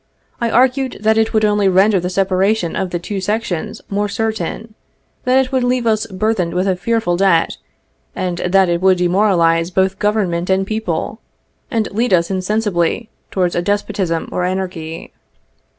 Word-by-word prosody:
I 235 - +1
argued 260 +2 +2
that 220 +1 +3
it 220 0 +1
would 215 -1 +2
only 205 -2 +2
render 190 +2 +4
the 180 +1 -3
separation 190 0 +1
of 190 - -2
the 175 - -2
two 195 +3 -5
sections 210 +1 -3
more 205 +1 -1
certain, 220 0 -3 0.5
that 260 +1 +4
it 255 - -13
would 260 -2 +1
leave 245 -1 +1
us 220 -1 +1
burthened 190 -3 -1
with 185 +2 +1
a 190 - +2
fearful 180 -2 0
debt, 185 -4 +2 0.6
and 180 -2 -2
that 190 +1 +3
it 170 0 0
would 190 -1 +4
demoralize 175 -2 +2
both 190 +1 0
Government 195 -5 0
and 190 0 +2
people, 220 +2 -3 0.5
and 225 -4 0
lead 230 +1 0
us 170 +1 0
insensibly 195 +1 -1 0.2
towards 180 -2 0
a 175 - +1
despotism 195 -3 -1
or 180 - -1
anarchy. 180 -3 -4
195 Hz, 165 wpm, -17 LUFS, 180-220 Hz, 0.6 s, render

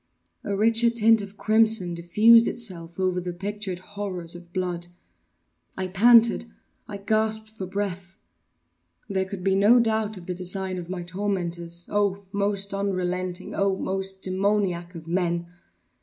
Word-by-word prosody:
A 200 - -2
richer 230 +2 +4
tint 225 -1 +4
of 200 0 -10
crimson 220 -5 +3
diffused 215 +7 +5
itself 180 -7 -4
over 185 -1 0
the 180 0 -4
pictured 200 0 -4
horrors 185 -3 -5
of 175 0 -12
blood. 175 -2 -3 0.9
I 190 -1 -3
panted! 230 +4 +5 0.4
I 205 - -6
gasped 220 +2 -1
for 195 -4 -7
breath! 190 -1 -4 0.9
There 190 -2 -1
could 190 -1 -7
be 195 0 +2
no 205 +5 +5
doubt 220 -2 0
of 175 - -11
the 180 - -3
design 185 +1 -3
of 175 -1 -8
my 180 -1 -4
tormentors—oh! 185 +1 -2
most 200 -1 -1
unrelenting! 185 -2 -2
oh! 195 -1 +1
most 190 0 -3
demoniac 185 -2 -1
of 165 -1 -9
men! 170 -1 0
190 Hz, 140 wpm, -25 LUFS, 180-205 Hz, 0.9 s, diffused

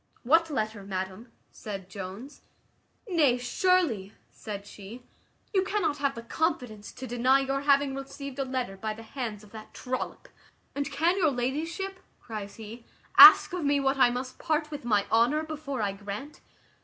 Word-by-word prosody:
"What 325 +6 +4
letter, 215 -7 -2
madam?" 190 +4 -5 0.2
said 195 -3 -7
Jones. 195 +8 -9 0.7
"Nay, 305 - +3
surely," 245 - +1 0.2
said 205 -2 -7
she, 210 +5 -11 0.5
"you 385 - +4
cannot 395 -6 -1
have 280 -1 0
the 230 - -7
confidence 245 -7 -2
to 260 - -8
deny 255 +2 +3
your 270 0 -1
having 280 -1 +3
received 275 0 -7
a - - +1
letter 255 -6 -3
by 215 +2 -4
the 225 - -11
hands 225 -3 -6
of 210 - -17
that 215 -1 -11
trollop." 255 0 -5 0.5
"And 280 -1 -3
can 335 +6 +1
your 325 -4 +4
ladyship," 320 +9 -3 0.2
cries 210 -3 -7
he, 225 +2 -10 0.4
"ask - - +10
of 360 -3 -2
me 285 0 +2
what 270 0 +1
I 245 - +6
must 250 +1 -5
part 310 -1 -1
with 290 -5 -7
my 210 -4 +2
honour 245 +7 +3
before 300 -6 -4
I 200 - 0
grant? 205 +9 -8
255 Hz, 165 wpm, -28 LUFS, 215-290 Hz, 0.7 s, ask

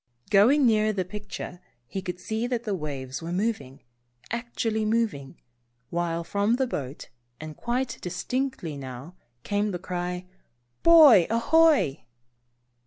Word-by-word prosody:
Going 250 +8 +5
nearer 215 -2 +3
the 190 -3 -2
picture 200 -2 -7 0.3
he 190 +10 -5
could 180 -2 -5
see 220 +5 -2
that 245 -2 -2
the 210 -4 -2
waves 140 -6 -5
were 165 +1 -5
moving, 175 - -3 0.5
actually 230 -2 -2
moving, 215 -11 -1 0.5
while 170 -1 -1
from 205 +6 +1
the 265 +1 +1
boat, 140 - -6 0.3
and 155 -1 -8
quite 240 0 -2
distinctly 250 - -3
now, 130 +4 -8 0.3
came 205 +1 0
the 180 - -3
cry, 180 0 -4 0.6
"Boy 300 - +8
ahoy." 245 - +3
200 Hz, 125 wpm, -26 LUFS, 170-235 Hz, 0.6 s, Boy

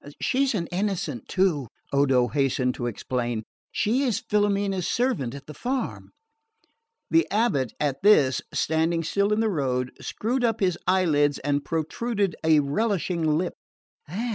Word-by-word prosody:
"She's 265 -2 +1
an 175 -4 -1
Innocent 180 - -2
too," 175 -9 +1 0.3
Odo 135 -3 +3
hastened 135 -3 +1
to 120 - -3
explain. 120 0 -2 0.3
"She 230 +5 +1
is 250 -6 +1
Filomena's 200 -3 +1
servant 165 - 0
at 140 0 -10
the 150 - -9
farm." 255 - -3 1.0
The 330 +1 +4
abate 160 - +1
at 140 -2 -1
this, 150 -11 +5
standing 165 +1 +1
still 200 +5 +1
in 210 +1 +2
the 225 - +2
road, 130 -6 -1
screwed 245 +4 -2
up 225 -2 +1
his 185 -4 +2
eyelids 150 -6 +3
and 145 0 0
protruded 195 +4 -1
a 160 -2 +5
relishing 165 -1 0
lip. 175 +1 -1
165 Hz, 140 wpm, -25 LUFS, 140-205 Hz, 1.0 s, this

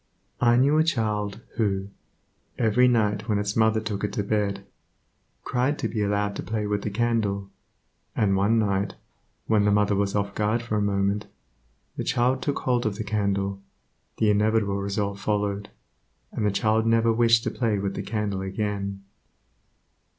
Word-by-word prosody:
I 120 0 +4
knew 140 +5 +4
a - - +5
child 105 -9 -1 0.2
who, 100 -3 0 0.7
every 120 +2 +4
night 110 -2 +1
when 105 - +2
its 100 0 -2
mother 110 0 +3
took 105 -2 -4
it 105 - -1
to 105 - -1
bed, 100 -1 -1 0.8
cried 130 +4 0
to - - -1
be 110 - -3
allowed 100 0 0
to - - -3
play 105 +2 -3
with 105 0 -1
the 105 - -3
candle; 100 -3 -1 0.6
and 100 -2 +2
one 100 +4 +3
night, 100 -2 0 0.5
when 105 -2 +3
the 105 - +3
mother 105 0 +3
was 100 0 0
off 100 -1 -1
guard 110 +3 0
for 110 -2 -3
a 105 - +1
moment, 100 +1 0 0.7
the - - -2
child 130 +1 +1
took 145 - -1
hold 125 -3 +1
of 105 - -2
the 110 - -4
candle; 100 -1 -1 0.6
the 105 -1 +3
inevitable 105 -1 +1
result 100 0 -2
followed, 100 0 -1 0.6
and 105 - -1
the - - +2
child 110 +2 +1
never 115 0 +3
wished 115 0 +4
to - - -1
play 115 -4 0
with 100 0 -2
the - - -4
candle 105 -3 -2
again. 100 0 -3
105 Hz, 170 wpm, -25 LUFS, 100-115 Hz, 0.8 s, a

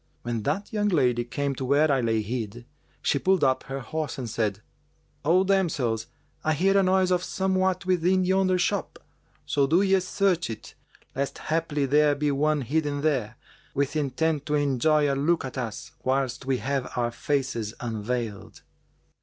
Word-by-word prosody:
When 120 -1 -2
that 200 - -2
young 210 -1 +1
lady 125 - +2
came 140 +3 -2
to 135 - -5
where 145 +4 +3
I 135 -2 +2
lay 110 -2 +1
hid, 115 +1 -5 0.4
she - - +2
pulled 190 -2 +2
up 130 -1 +3
her 135 0 -5
horse 155 +3 -4
and 130 -3 -4
said, 110 -2 -2 0.6
'O 175 +5 +4
damsels, 165 - 0 0.4
I 155 - +2
hear 190 +6 +2
a 195 - +6
noise 185 0 +3
of 180 0 +2
somewhat 190 -1 0
within 185 +1 +2
yonder 190 0 +2
shop: 175 - -1 0.5
so 140 -1 +2
do 170 +7 +4
ye 195 -1 +4
search 180 -3 0
it, 110 -2 -8 0.4
lest 140 +1 -2
haply 155 -3 -1
there 145 +1 +4
be 145 0 0
one 150 +1 +1
hidden 145 +2 -1
there, 125 -7 0 0.4
with 140 +1 0
intent 150 +1 0
to 150 - +1
enjoy 145 +1 +2
a 140 - +1
look 145 +3 +1
at 130 - -7
us, 115 -4 -5
whilst 130 -1 -1
we 135 -1 +2
have 135 -1 -2
our 120 -1 0
faces 120 -4 -2
unveiled.' 115 -2 -4
145 Hz, 170 wpm, -26 LUFS, 125-175 Hz, 0.6 s, a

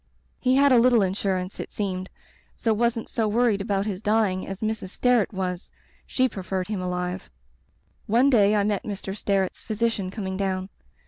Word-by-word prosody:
He 255 0 +2
had 280 0 +5
a 250 - +7
litde 235 -4 +5
insurance, 190 -1 -2
it - - -6
seemed, 190 -2 -3 0.5
so 225 - +1
wasn't 235 +1 0
so 225 -2 -1
worried 220 -1 +2
about 200 -1 -1
his 200 -3 -3
dying 210 -4 +1
as 195 0 -6
Mrs. 215 -3 -2
Sterret 245 0 +2
was. 185 -2 -4 0.4
She 260 0 +2
preferred 190 -3 -4
him 205 -4 -2
alive. 180 0 -3 0.8
"One 240 +6 +4
day 210 -3 +5
I 205 - +3
met 205 -1 0
Mr. 195 -2 -5
Sterret's 195 -2 -1
physician 220 -3 -1
coming 190 -2 -4
down. 190 -1 -2
205 Hz, 170 wpm, -25 LUFS, 190-225 Hz, 0.8 s, a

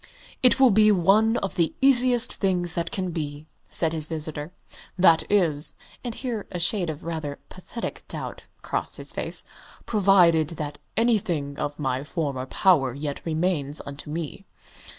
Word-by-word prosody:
"It 255 +1 +5
will 260 -3 +6
be 215 +1 +5
one 210 +5 +3
of 195 - -5
the 170 -2 0
easiest 255 -3 +4
things 180 -3 0
that 170 -1 -2
can 185 -2 -3
be," 150 -2 -5 0.2
said 165 -1 +1
his 155 -2 +1
visitor, 155 0 -5 0.5
"that 170 -3 +5
is" 165 -7 +2 0.3
(and 240 -2 -4
here 235 -6 -4
a 180 - -4
shade 180 0 0
of 155 -1 -6
rather 155 -4 -4
pathetic 185 +5 -7
doubt - - -6 0.2
crossed - - -1
his - - -4
face) - - -1 0.4
"provided 180 -7 +4
that 150 -1 -5 0.2
anything 190 -11 +1
of 145 0 -3
my 135 -2 -2
former 145 -5 -3
power 135 -8 +3
yet 145 0 -5
remains 155 -3 0
unto 140 +1 -7
me." 165 +5 -6
170 Hz, 150 wpm, -25 LUFS, 150-200 Hz, 0.5 s, will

